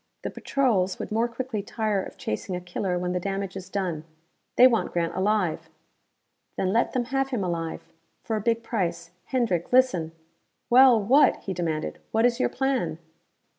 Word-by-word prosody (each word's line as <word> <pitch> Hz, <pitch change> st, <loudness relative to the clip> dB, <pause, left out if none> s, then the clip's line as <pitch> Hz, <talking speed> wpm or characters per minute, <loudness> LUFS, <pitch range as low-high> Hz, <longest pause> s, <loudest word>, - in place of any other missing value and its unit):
The -, -, -3 dB
patrols 205 Hz, -9 st, 0 dB
would -, -, -6 dB
more 225 Hz, +2 st, +1 dB
quickly 240 Hz, -2 st, -4 dB
tire 210 Hz, -1 st, -1 dB
of -, -, -9 dB
chasing 145 Hz, -, -4 dB
a -, -, -3 dB
killer 180 Hz, +1 st, -3 dB
when 180 Hz, 0 st, -2 dB
the 180 Hz, -, 0 dB
damage 195 Hz, 0 st, -3 dB
is 190 Hz, -1 st, -7 dB
done. 180 Hz, -6 st, -2 dB, 0.5 s
They 250 Hz, -, +8 dB
want 240 Hz, -3 st, +3 dB
Grant 170 Hz, -1 st, 0 dB
alive." 190 Hz, -3 st, 0 dB, 0.9 s
"Then 190 Hz, 0 st, 0 dB
let 235 Hz, -, +1 dB
them 250 Hz, -2 st, 0 dB
have 270 Hz, 0 st, +1 dB
him 245 Hz, -7 st, -2 dB
alive 165 Hz, -2 st, -3 dB, 0.4 s
for 225 Hz, -, -2 dB
a 215 Hz, -, -1 dB
big 230 Hz, +2 st, 0 dB
price. 170 Hz, -7 st, -2 dB
Hendrick, 230 Hz, -10 st, -1 dB
listen 215 Hz, -11 st, +3 dB, 0.3 s
" -, -, -49 dB
"Well, 250 Hz, -1 st, +7 dB
what?" 255 Hz, +9 st, +5 dB
he 190 Hz, -, -3 dB
demanded 165 Hz, -3 st, -3 dB
again. -, -, -31 dB
"What 225 Hz, +1 st, +3 dB
is 245 Hz, 0 st, +2 dB
your -, -, +2 dB
plan?" 255 Hz, -, -1 dB
200 Hz, 180 wpm, -26 LUFS, 180-240 Hz, 0.9 s, They